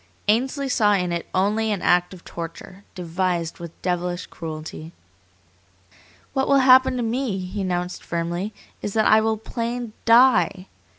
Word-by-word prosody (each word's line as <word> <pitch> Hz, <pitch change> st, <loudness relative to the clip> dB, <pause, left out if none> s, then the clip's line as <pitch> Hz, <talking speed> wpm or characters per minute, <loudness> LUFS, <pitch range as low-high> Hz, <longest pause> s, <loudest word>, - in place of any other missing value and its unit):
Ainsley 260 Hz, +6 st, +1 dB
saw 210 Hz, -5 st, +3 dB
in 180 Hz, -3 st, 0 dB
it 170 Hz, -1 st, -3 dB
only 210 Hz, +4 st, +1 dB
an 200 Hz, -, -2 dB
act 175 Hz, 0 st, +3 dB
of 185 Hz, -3 st, -13 dB
torture, 170 Hz, +3 st, -8 dB
devised 175 Hz, -1 st, -2 dB
with 170 Hz, -1 st, -10 dB
devilish 180 Hz, 0 st, -2 dB
cruelty. 160 Hz, 0 st, -8 dB, 1.4 s
"What 265 Hz, -1 st, 0 dB
will 280 Hz, -, +4 dB
happen 260 Hz, 0 st, +6 dB
to 245 Hz, -, -1 dB
me," 230 Hz, -2 st, -1 dB
he 190 Hz, +2 st, -5 dB
announced 180 Hz, -1 st, -3 dB
firmly, 170 Hz, +4 st, -3 dB, 0.3 s
"is 205 Hz, -, -4 dB
that 220 Hz, -1 st, +3 dB
I 215 Hz, 0 st, +6 dB
will 220 Hz, 0 st, 0 dB
plain 235 Hz, +1 st, -4 dB
DIE! 230 Hz, -6 st, +4 dB
190 Hz, 145 wpm, -23 LUFS, 175-230 Hz, 1.4 s, happen